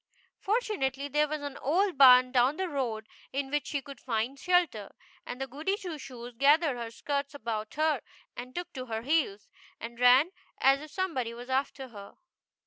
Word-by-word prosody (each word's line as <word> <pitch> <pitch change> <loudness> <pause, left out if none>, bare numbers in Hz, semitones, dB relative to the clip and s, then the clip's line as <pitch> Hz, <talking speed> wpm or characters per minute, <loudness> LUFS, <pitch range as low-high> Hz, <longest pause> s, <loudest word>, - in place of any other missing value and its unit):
Fortunately 385 - -1
there 300 +2 +2
was 305 0 -4
an 285 -1 -5
old 360 +6 +1
barn 255 -2 +8
down 255 +3 +3
the 375 0 -1
road, 240 -8 -3 0.2
in 275 0 -3
which 295 0 -1
she 280 -2 -3
could 275 -2 -10
find 245 +3 -2
shelter, 345 - +1 0.3
and 265 +2 -4
Goody 320 +9 -1
Two 350 -7 -6
Shoes 245 -2 -9
gathered 295 +1 +4
her 235 -1 -5
skirts 280 +4 -3
about 220 -4 -4
her 310 -4 +1 0.3
and 250 +1 -8
took 350 0 -5
to 255 -2 -6
her 225 -1 -4
heels, 260 -8 0 0.3
and 235 +1 -8
ran 255 +7 +6 0.3
as 270 +1 +5
if 305 - -9
some 375 +2 -2
body 235 -4 -3
was 245 +2 -8
after 265 0 -1
her. 200 -3 -11
270 Hz, 180 wpm, -29 LUFS, 245-305 Hz, 0.3 s, barn